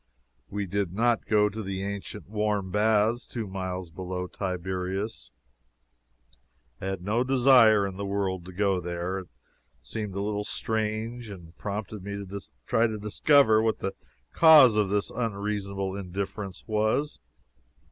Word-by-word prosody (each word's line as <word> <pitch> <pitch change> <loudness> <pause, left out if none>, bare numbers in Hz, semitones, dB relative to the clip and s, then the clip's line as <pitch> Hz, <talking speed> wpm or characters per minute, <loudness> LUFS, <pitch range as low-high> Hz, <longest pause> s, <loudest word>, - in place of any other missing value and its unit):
We 100 0 -3
did 95 -1 -2
not 115 +2 +1
go 105 -1 +4
to 110 +2 -5
the 95 -1 -4
ancient 100 0 -6
warm 105 -2 -1
baths 110 +3 +2
two 115 -3 -4
miles 95 -2 -5
below 90 +2 -4
Tiberias. 95 - -4 1.5
I 95 - -3
had 95 -2 -3
no 110 +5 +1
desire 125 -5 +6
in 95 -1 -5
the 100 - -3
world 95 -2 -1
to 95 - -9
go 95 0 +1
there. 90 +2 -3
This - - -31 0.5
seemed 105 -4 -5
a - - -2
little 105 0 -1
strange, 110 +2 -3
and 85 -4 -11
prompted 105 -1 -5
me 100 +1 -5
to 100 0 -6 0.2
try 115 +1 +3
to 110 -1 -4
discover 110 +2 +4
what 110 0 +1
the 95 0 -3 0.4
cause 150 -8 +8
of 105 -2 +2
this 100 0 0
unreasonable 100 -4 -2
indifference 100 +1 -5
was. 110 +6 0
100 Hz, 145 wpm, -27 LUFS, 95-110 Hz, 1.5 s, cause